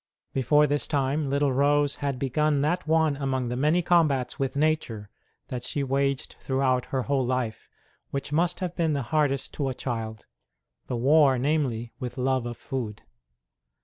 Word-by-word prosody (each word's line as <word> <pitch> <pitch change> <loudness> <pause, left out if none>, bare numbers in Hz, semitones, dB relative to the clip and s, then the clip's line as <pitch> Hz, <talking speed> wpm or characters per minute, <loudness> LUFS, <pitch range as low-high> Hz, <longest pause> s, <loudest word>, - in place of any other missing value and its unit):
Before 150 +3 +4
this 145 0 0
time 140 0 0
little 140 -1 +1
Rose 145 +1 +2
had 140 -2 -2
begun 140 +3 +1
that 170 +4 0
one 160 -2 +3
among 130 -3 -1
the 125 - -2
many 155 +7 +2
combats 150 -8 +2
with 135 -1 -1
nature 140 -9 -1 0.4
that 125 -2 -4
she 140 +3 -2
waged 135 0 -1
throughout 130 -2 +1
her 130 -2 -1
whole 135 0 +1
life 125 -3 -2 0.4
which 140 +1 -4
must 175 +4 +1
have 180 -2 -3
been 165 -3 +1
the 140 -2 -1
hardest 145 -3 +1
to 140 -3 -1
a 130 - -4
child 110 -4 -4 0.6
the 125 - -2
war, 140 +1 +5
namely, 125 -4 -1
with 125 0 -5
love 130 -1 0
of 120 -1 -6
food. 120 -5 -5
135 Hz, 165 wpm, -26 LUFS, 125-150 Hz, 0.6 s, war